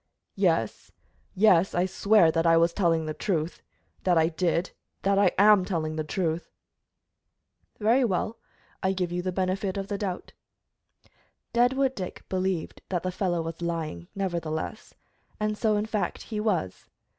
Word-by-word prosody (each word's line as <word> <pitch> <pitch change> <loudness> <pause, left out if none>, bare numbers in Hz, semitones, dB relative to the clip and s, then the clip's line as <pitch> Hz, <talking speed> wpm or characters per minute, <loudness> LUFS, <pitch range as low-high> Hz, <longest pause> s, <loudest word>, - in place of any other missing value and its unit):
"Yes, - - 0 0.4
yes, 190 -2 +4
I 175 +1 +2
swear 195 -2 +4
that 165 +1 +1
I 165 0 +6
was 170 +1 +3
telling 165 -4 +1
the 155 - -3
truth 165 -2 -2 0.4
that 180 -2 +3
I 160 0 +4
did 170 +2 0 0.3
that 195 0 +3
I 200 - +5
am 205 -1 +6
telling 160 -4 -2
the 155 - -2
truth!" 165 +1 -2 1.3
"Very 230 +5 +3
well, 220 +1 -1 0.4
I 190 0 +1
give 180 -2 -2
you 175 0 -1
the 185 +1 -2
benefit 190 +1 -1
of 195 0 -4
the 200 -1 -2
doubt." 185 -4 -4 1.2
Deadwood 260 +2 +3
Dick 185 -7 -6
believed 185 -3 -2
that 175 -3 -1
the 185 - -1
fellow 175 -2 -1
was 165 +1 -6
lying, 160 - -3
nevertheless, 175 +1 -3 0.4
and 215 0 0
so, 215 -1 +1
in 210 - 0
fact, 220 -2 -2
he 215 -2 -4
was. 190 - -2
185 Hz, 155 wpm, -27 LUFS, 165-205 Hz, 1.3 s, I